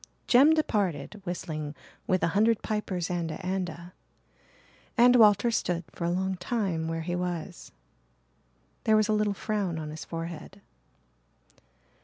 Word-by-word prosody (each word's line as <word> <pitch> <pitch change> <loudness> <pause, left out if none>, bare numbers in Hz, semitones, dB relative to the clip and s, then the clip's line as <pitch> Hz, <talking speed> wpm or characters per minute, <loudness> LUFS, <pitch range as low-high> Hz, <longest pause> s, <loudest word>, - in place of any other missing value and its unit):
Jem 280 +6 +6
departed 205 - -1
whistling 155 -4 -4 0.3
"Wi' 185 - +3
a - - +4
hundred 220 +2 +3
pipers 190 -5 -2
and 170 -2 -2
a' 170 +4 -6
and 185 -1 -1
a'," 170 +3 -11 1.0
and 245 +1 +7
Walter 220 0 +5
stood 175 -6 -1
for 170 - -5
a - - +1
long 190 +1 -1
time 180 -5 -2
where 165 0 -3
he 175 +1 -2
was. 175 0 -4 1.1
There 220 -1 +5
was 215 0 +2
a - - +3
little 210 -1 +1
frown 195 -5 -2
on 155 -1 -5
his 155 - -7
forehead. 165 +3 -7
185 Hz, 145 wpm, -28 LUFS, 170-210 Hz, 1.1 s, and